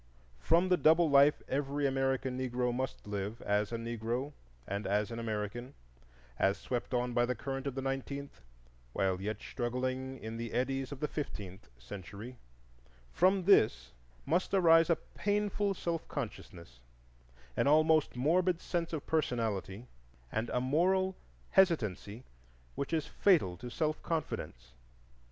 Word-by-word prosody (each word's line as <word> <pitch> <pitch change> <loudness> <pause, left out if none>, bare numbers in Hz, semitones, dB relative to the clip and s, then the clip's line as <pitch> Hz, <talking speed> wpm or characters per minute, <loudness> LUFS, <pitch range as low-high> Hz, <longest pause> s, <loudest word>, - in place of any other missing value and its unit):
From 170 +3 +3
the 180 - +4
double 160 0 +5
life 140 +1 +5
every 140 +1 -1
American 135 -1 0
Negro 125 -1 -1
must 130 +2 -4
live, 105 +2 -4
as 105 +1 +1
a - - -2
Negro 115 +4 -3 0.3
and 100 +1 -3
as 105 +3 0
an 115 - -4
American, 115 +3 -4 0.6
as 95 +1 +3
swept 120 -2 -4
on 125 0 0
by 120 0 +3
the 125 - -1
current 135 +3 -4
of 135 - -3
the 135 - -3
nineteenth 135 +1 -4 0.5
while 95 -1 0
yet 105 +1 -3
struggling 130 +2 -3
in 110 -1 -6
the 115 -1 -5
eddies 135 +2 -1
of 140 0 -7
the 150 - +1
fifteenth 95 - -6
century,—from 60 - -4
this 180 - +4 0.3
must 180 +6 +1
arise 165 -3 +6
a 170 - +5
painful 205 +2 -1
self 170 -2 -3
consciousness, 75 -8 -7 0.8
an - - +2
almost 155 0 +4
morbid 170 +7 +2
sense 170 -2 -3
of 155 - -3
personality 115 -8 -1 0.5
and 110 +2 -2
a - - 0
moral 185 +8 +2 0.4
hesitancy 115 - +2 0.5
which 140 - -4
is 160 -3 0
fatal 160 - +3
to 120 +6 -8
self 155 +4 -1
confidence. 65 - -4
130 Hz, 135 wpm, -32 LUFS, 110-155 Hz, 0.8 s, arise